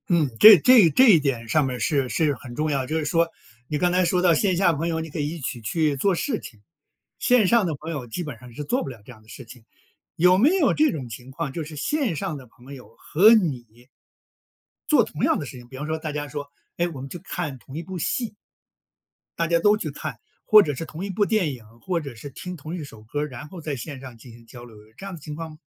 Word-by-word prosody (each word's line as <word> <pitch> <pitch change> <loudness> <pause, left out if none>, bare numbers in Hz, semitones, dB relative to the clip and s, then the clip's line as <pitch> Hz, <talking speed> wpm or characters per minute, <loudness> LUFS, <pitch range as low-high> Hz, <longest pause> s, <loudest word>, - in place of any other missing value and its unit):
嗯， 165 -6 +2
这 215 -2 +11
这 215 - +6
这 255 - +5
一 175 -7 +7
点 130 -6 -2
上 150 +6 +2
面 130 -1 -3
儿 - - -7
是 135 +1 0
是 150 +1 +1
很 125 -1 -11
重 155 +3 -1
要。 135 -3 -1
就 155 +5 -2
是 155 - -2
说 165 +3 +2 0.4
你 150 - -2
刚 175 +3 +1
才 180 +1 +3
说 180 +1 +1
到 175 -2 +5
线 185 +3 +1
下 175 -2 +3
朋 160 +3 -2
友， 165 -1 -1
你 160 0 -5
可 155 - -6
以 145 0 -1
一 170 +1 -6
起 125 -4 -5
去 150 +6 0
做 190 +8 +1
事 230 - -2
情， 110 - -12 0.6
线 245 -5 +4
上 230 0 +4
的 165 -4 -2
朋 155 +4 -7
友 145 -6 -5
基 145 +10 -5
本 150 -7 -7
上 125 -1 -13
是 150 - -6
做 250 - -1
不 - - -6
了 120 -5 -11
这 - - -11
样 110 -3 -15
的 110 - -22
事 130 - -10
情， 115 +1 -14 0.5
有 180 +2 +5
没 245 +10 +5
有 310 -7 +3
这 310 0 +3
种 135 -5 -5
情 120 +3 -10
况， 135 0 -4
就 165 - -4
是 155 0 -9
线 250 - -1
上 155 +1 -3
的 135 -3 -11
朋 125 +4 -14
友 125 -4 -13
和 205 +8 +5
你 125 - -2 1.0
做 295 -6 +5
同 155 - -6
样 - - +3
的 145 - -5
事 130 - -9
情， 120 -1 -13
比 130 - -11
方 150 +3 -5
说 160 0 -1
大 155 -1 -5
家 145 0 -4
说， 145 0 -6 0.3
诶， 175 - +1
我 140 -6 -8
们 135 - -7
去 175 - -7
看 175 -7 -5
同 130 - -13
一 165 - -4
部 185 +2 -7
戏？ 225 +7 -2 1.0
大 165 - +1
家 170 +1 +2
都 205 +4 +4
去 155 -8 -4
看。 140 - -7 0.3
或 215 -1 +8
者 145 -7 -2
是 145 - -5
同 165 +3 -7
一 - - -6
部 205 +2 +1
电 210 -7 +1
影， 120 -3 -11 0.2
或 175 +5 -2
者 140 -4 -8
是 120 +5 -9
听 180 +6 -8
同 155 +3 -7
一 170 - -5
首 110 -6 -12
歌 145 +7 -4
儿， 150 - -2
然 130 +2 -9
后 175 +1 -10
在 150 -2 -4
线 135 +1 -7
上 130 -3 -10
进 115 +1 -14
行 115 0 -16
交 120 +1 -12
流， 115 -2 -15
有 105 +1 -17
这 - - -9
样 195 -2 -6
的 160 - -13
情 150 +1 -7
况 160 +1 -6
嘛？ 155 - -14
150 Hz, 295 characters per minute, -24 LUFS, 130-175 Hz, 1.0 s, 这